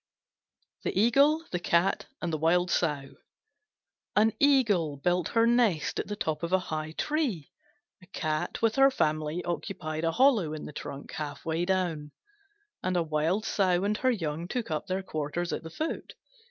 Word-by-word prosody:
THE - - -1
EAGLE, 280 +8 +4
THE 180 - -1
CAT, 170 +2 +1 0.2
AND 170 -2 -1
THE 155 - -1
WILD 175 +3 +2
SOW 145 -5 -1 1.0
An 220 +1 +4
Eagle 215 - +3
built 175 +3 +1
her 230 -1 +3
nest 230 -9 +2
at - - -3
the 210 - -3
top 160 -7 -2
of 170 0 -3
a 190 - +5
high 155 -3 -4
tree; 260 - -1 0.5
a 185 - -17
Cat 155 +1 -3
with 225 +1 +2
her 270 0 +7
family 155 - -1
occupied 160 -1 -4
a 165 - +2
hollow 230 - +3
in 155 - -6
the - - -8
trunk 140 0 -7
half 145 -2 -6
way 165 +2 0
down; 175 -6 -1 0.7
and 185 0 0
a 170 - +2
Wild 160 +6 0
Sow 185 -2 +2
and 205 +1 +1
her 260 - +2
young 165 -7 -2
took 235 -3 -3
up 155 - -2
their 190 +1 -2
quarters 165 +1 -3
at - - -3
the 165 - -8
foot. 310 - -4
175 Hz, 175 wpm, -28 LUFS, 155-215 Hz, 1.0 s, her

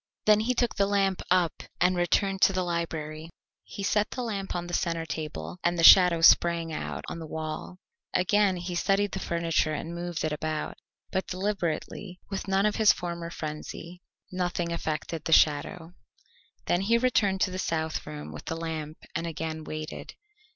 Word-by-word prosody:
Then 215 0 +6
he 245 +4 0
took 240 0 +1
the 200 -1 +1
lamp 195 -2 +1
up 180 -2 +2 0.2
and 180 +1 +3
returned 195 +2 +1
to 195 - +5
the 185 0 0
library. 165 -2 -3 0.3
He 200 - -7
set 210 +1 +1
the 250 - -4
lamp 200 -4 -3
on 175 0 -2
the 175 - -8
centre 165 -1 0
table, 155 +3 -5
and 175 0 +1
the 165 - +1
shadow 180 -2 +8
sprang 165 -1 +5
out - - -5
on - - -5
the 160 - -7
wall. 155 +3 -5 0.3
Again 190 +1 +2
he 175 +1 -5
studied 195 +3 +1
the 195 - -3
furniture 165 -3 0
and 165 +3 -5
moved 175 -1 -4
it 155 - 0
about, 155 +1 -3 0.3
but 190 - -1
deliberately, 185 -1 -3
with 195 0 -4
none 195 +1 +2
of 210 - +1
his 220 -2 +6
former 170 -1 -4
frenzy. 165 +2 -7 0.3
Nothing 175 -2 -2
affected 160 -1 -3
the 160 - +2
shadow. 160 +3 +3 0.7
Then 175 - +1
he 230 +4 +3
returned 210 -6 +2
to 185 - +2
the 185 - -4
south 160 -3 -2
room 75 0 -7
with 75 - -9
the 165 - -3
lamp 160 -2 -5 0.2
and 170 +1 -2
again 160 0 -4
waited. 155 0 -7
175 Hz, 180 wpm, -28 LUFS, 160-195 Hz, 0.7 s, shadow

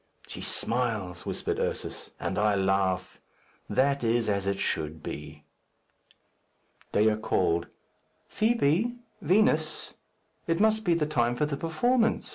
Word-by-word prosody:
"She - - -7
smiles," 110 -8 -1
whispered - - -2
Ursus, - - -3
"and - - -2
I 105 -1 +3
laugh. 95 -1 0 0.5
That 140 0 +2
is 115 0 +2
as 100 -1 0
it 100 0 0
should 80 -4 -2
be." 75 0 -7 1.5
Dea 105 +1 +3
called, 85 -5 0 0.6
"Fibi! 220 0 +1 0.3
Vinos! 160 -6 +2 0.5
It 165 +1 +1
must 220 +1 +3
be 175 -2 +3
the 160 -2 +1
time 120 -5 +1
for 150 - +1
the 150 -1 -2
performance. 225 - +1
120 Hz, 120 wpm, -28 LUFS, -, 1.5 s, I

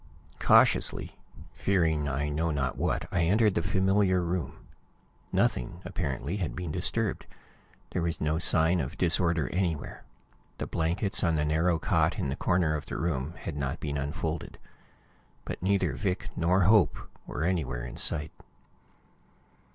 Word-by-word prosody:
Cautiously, - - +3 0.3
fearing 80 -6 +1
I 70 +2 -1
know 80 +3 -1
not 70 -4 -1
what, - - -1
I 85 - +1
entered 105 +3 +3
the - - 0
familiar 95 -1 +2
room. 85 -1 -3 0.7
Nothing, - - 0
apparently, 70 +7 -3
had 90 -5 -3
been 90 -4 -4
disturbed. 100 +5 -1 0.6
There 90 - -1
was 85 0 -2
no 75 +1 0
sign 85 +1 +3
of 75 +5 -4
disorder 85 -3 +2
anywhere. 85 -6 -2 0.5
The - - -3
blankets 90 +4 +1
on 85 -2 +2
the 75 -1 +1
narrow 80 +3 +2
cot - - +1
in 70 - -2
the 65 - -2
corner 85 -3 +1
of 75 - -5
the - - -4
room 80 -1 -2
had 80 - -6
not 70 -3 -3
been 70 -1 -3
unfolded. 80 +2 -4 0.9
But - - -6
neither 95 -5 +1
Vic 95 +6 -2
nor 90 +3 +2
Hope 105 +1 +4 0.3
were 75 - -3
anywhere 70 -9 -1
in 60 - -7
sight. 75 +1 +1
85 Hz, 145 wpm, -28 LUFS, 75-90 Hz, 0.9 s, Hope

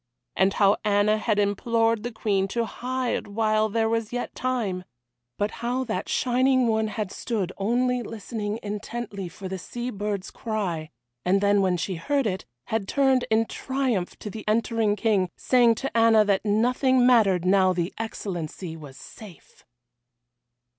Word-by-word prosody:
And 190 +1 +3
how 200 0 +4
Anna 210 +1 +3
had 215 -1 0
implored 225 +2 +1
the 240 +2 -4
Queen 200 -4 0
to 235 +4 -1
hide 250 +1 -3
while 215 +1 +1
there 225 +1 +1
was 225 -1 -1
yet 245 0 -4
time. 225 -8 -2 0.5
But 205 +1 0
how 245 +2 -1
that 220 -6 -3
shining 255 +1 +2
one 220 -1 +1
had 215 -2 -4
stood 200 -6 -3
only 245 +4 +1
listening 215 -1 -5
intently 210 -2 -5
for 190 +2 -8
the 190 0 -5
sea 240 +7 -5
bird's 205 -2 -4
cry, 185 -9 -3 0.3
and 190 +2 +3
then 200 0 +3
when 185 -2 +2
she 185 +1 -3
heard 275 - 0
it, 190 - -2 0.2
had 220 -3 -1
turned 265 -1 +2
in 220 +1 +3
triumph 255 -8 -2
to 210 - -7
the 220 +1 -7
entering 220 -1 +1
King, 200 -3 +1
saying 240 -3 +4
to 270 +3 -5
Anna 225 -2 +5
that 200 -2 +1
nothing 245 +4 +3
mattered 205 -8 +4
now 190 0 +4
the 175 0 -2
Excellency 180 -6 -5
was 145 -4 -11
safe! 200 -8 -14
215 Hz, 155 wpm, -25 LUFS, 195-235 Hz, 0.5 s, Anna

